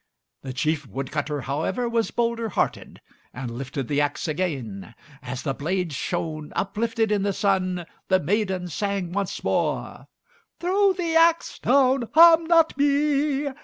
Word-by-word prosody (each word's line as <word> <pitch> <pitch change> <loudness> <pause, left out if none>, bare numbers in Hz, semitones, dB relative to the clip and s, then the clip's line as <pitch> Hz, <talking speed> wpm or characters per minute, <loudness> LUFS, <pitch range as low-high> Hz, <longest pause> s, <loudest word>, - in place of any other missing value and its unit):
The 135 - -6
chief 150 +2 -1
wood 130 +5 -5
cutter, 150 -1 -2
however, 155 - -2
was 230 -1 0
bolder 230 -1 -1
hearted, - - -2 0.3
and 125 -2 -5
lifted 135 0 -5
the 145 0 +1
axe 145 +2 -2
again. 130 - -4 0.3
As 130 0 -6
the 135 - -1
blade 170 +3 -2
shone 155 -1 -3
uplifted 225 +2 -1
in 205 -2 +2
the 200 0 0
sun, 185 -3 0 0.2
the 185 -1 +3
maiden 190 +1 -1
sang 195 +1 -2
once 195 0 -3
more, - - -2 0.5
"Throw 385 +2 +2
the 340 -3 -2
axe 330 0 +3
down, 260 -3 +3
harm 330 0 +8
not 330 -1 +4
me. 285 0 +2
190 Hz, 145 wpm, -24 LUFS, -, 0.5 s, harm